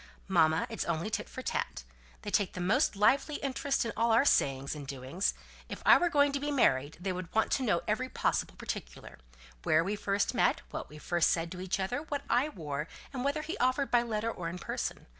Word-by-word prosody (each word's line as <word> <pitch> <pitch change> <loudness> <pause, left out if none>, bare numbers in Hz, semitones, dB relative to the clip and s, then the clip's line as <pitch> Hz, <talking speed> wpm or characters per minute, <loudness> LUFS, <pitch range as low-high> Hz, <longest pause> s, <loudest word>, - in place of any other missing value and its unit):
"Mamma, 160 -4 +3
it's - - -3
only 170 +5 -2
tit - - -3
for - - -7
tat. - - -3 0.4
They 205 - -4
take 200 -3 +1
the - - -6
most 210 - +2
lively 275 +8 +3
interest 275 -1 -1
in 230 - -2
all 230 +1 +2
our 230 +5 +5
sayings 135 - +2
and 145 -2 -8
doings. 135 +7 -2 0.3
If - - -7
I - - +9
were 350 - +2
going 285 -2 +4
to 280 - -1
be 290 +1 -2
married, 145 - +2
they 185 +1 -2
would 180 -1 -6
want 220 - +2
to 265 - +1
know 205 -8 +1
every 250 +5 0
possible - - -1
particular, - - -7 0.4
when 155 - +3
we 200 +2 -1
first 200 0 0
met, - - +2
what - - -5
we 150 - -11
first 170 +2 +1
said 165 0 0
to 180 - -6
each 185 +1 -2
other, 195 +8 -1
what 290 -2 -4
I 250 +5 +3
wore, 150 - -4 0.3
and 250 -2 -3
whether 285 +2 0
he 325 - -4
offered 260 +2 +1
by 240 - +5
letter 230 -1 -2
or 170 -5 -5
in 175 - -6
person. - - -4
205 Hz, 220 wpm, -31 LUFS, 165-260 Hz, 0.4 s, I